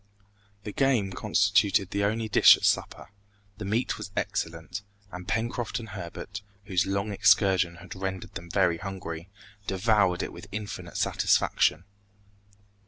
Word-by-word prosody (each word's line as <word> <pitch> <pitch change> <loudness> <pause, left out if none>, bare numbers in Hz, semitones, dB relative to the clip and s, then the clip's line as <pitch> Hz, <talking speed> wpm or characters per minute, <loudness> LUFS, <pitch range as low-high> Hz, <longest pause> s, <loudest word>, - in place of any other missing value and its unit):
The 105 - -5
game 120 -7 +1
constituted 100 -1 +2
the 100 0 0
only 110 +2 -1
dish 105 - +7
at - - -14
supper; - - 0 0.5
the 105 - -5
meat 110 +6 -1
was - - -6
excellent, 80 +3 -3 0.3
and 90 0 -8
Pencroft 115 +1 -2
and 110 -2 -9
Herbert, 95 +2 -7 0.2
whose 95 -1 +1
long 100 +2 -1
excursion 95 -3 +3
had 90 +1 -10
rendered 95 0 -5
them 85 0 -8
very 85 -2 +2
hungry, 95 -3 -6 0.4
devoured 100 -2 +2
it - - -5
with 100 - -10
infinite 105 0 -6
satisfaction. 80 - +2
100 Hz, 135 wpm, -27 LUFS, 90-105 Hz, 0.5 s, dish